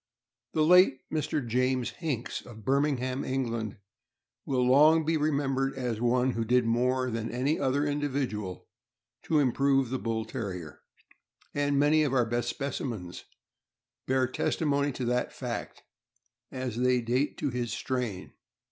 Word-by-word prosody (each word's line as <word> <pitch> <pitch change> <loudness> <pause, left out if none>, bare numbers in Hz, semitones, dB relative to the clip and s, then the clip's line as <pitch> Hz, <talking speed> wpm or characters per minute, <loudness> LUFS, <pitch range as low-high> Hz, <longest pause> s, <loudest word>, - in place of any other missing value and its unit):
The 155 - +2
late 180 -6 +6
Mr. 150 -3 -1
James 125 +1 +1
Hinks, 145 -9 -4
of 110 -3 -12
Birmingham, 135 -1 +1
England, 115 -5 -2 0.7
will 130 -2 +1
long 150 +5 +5
be 160 +1 +1
remembered 140 -3 0
as 120 -4 -3
one 125 +2 +2
who 115 -2 -2
did 125 +1 +2
more 125 +2 +1
than 115 0 -3
any 130 +7 0
other 140 +2 +1
individual 135 -10 -2 0.5
to 160 - 0
improve 135 -1 +2
the 130 - -1
Bull 110 -1 -2
Terrier, 95 - -6 0.7
and 145 0 +1
many 150 +2 +4
of 140 -3 +1
our 125 -2 +3
best 120 +1 -1
specimens 115 -10 -4 0.8
bear 130 0 +2
testimony 140 +2 0
to 125 - -4
that 125 +1 0
fact, - - -6 0.7
as 130 -3 -4
they 125 0 +3
date 125 +5 0
to - - -1
his 120 -2 -2
strain. 115 -5 -3
130 Hz, 140 wpm, -29 LUFS, 120-140 Hz, 0.8 s, late